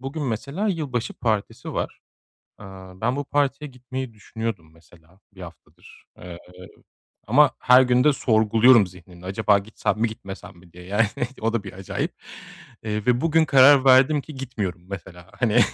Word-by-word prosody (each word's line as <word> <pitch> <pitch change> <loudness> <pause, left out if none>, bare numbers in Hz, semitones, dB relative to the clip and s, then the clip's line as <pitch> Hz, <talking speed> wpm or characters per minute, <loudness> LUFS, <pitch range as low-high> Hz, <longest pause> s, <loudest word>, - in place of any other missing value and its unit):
Bugün 135 +4 -5
mesela 140 - -3
yılbaşı 145 - -3
partisi 110 -4 -3
var. - - -4 0.6
Iıı, 95 -1 -12
ben 120 +3 0
bu 145 - -3
partiye 145 +1 -1
gitmeyi 125 0 -7
düşünüyordum 105 -6 -6
mesela 85 +2 -23
1 95 - -14
haftadır, 85 -4 -15
eee, 90 -1 -10 0.9
ama - - +5
her 125 +1 +6
gün 125 +1 +2
de 150 - +5
sorguluyorum 110 -2 +4
zihnimde 90 0 -15
acaba 100 +1 +2
gitsem 105 +1 -3
mi 115 - +2
gitmesem 95 -4 -10
mi 85 -1 -20
diye, 90 0 -13
yani, 105 +3 +1 0.3
o 115 +1 -1
da 110 -3 -2
bir 100 - -8
acayip, 95 +1 -5 0.7
eee, 105 0 -3
ve 125 0 +2
bugün 160 0 +2
karar 135 -1 +6
verdim 135 +3 +5
ki 155 +1 -12
gitmiyorum 105 -9 -5
mesela, 90 -1 -10
hani, 120 0 +3
110 Hz, 155 wpm, -23 LUFS, 95-130 Hz, 0.9 s, her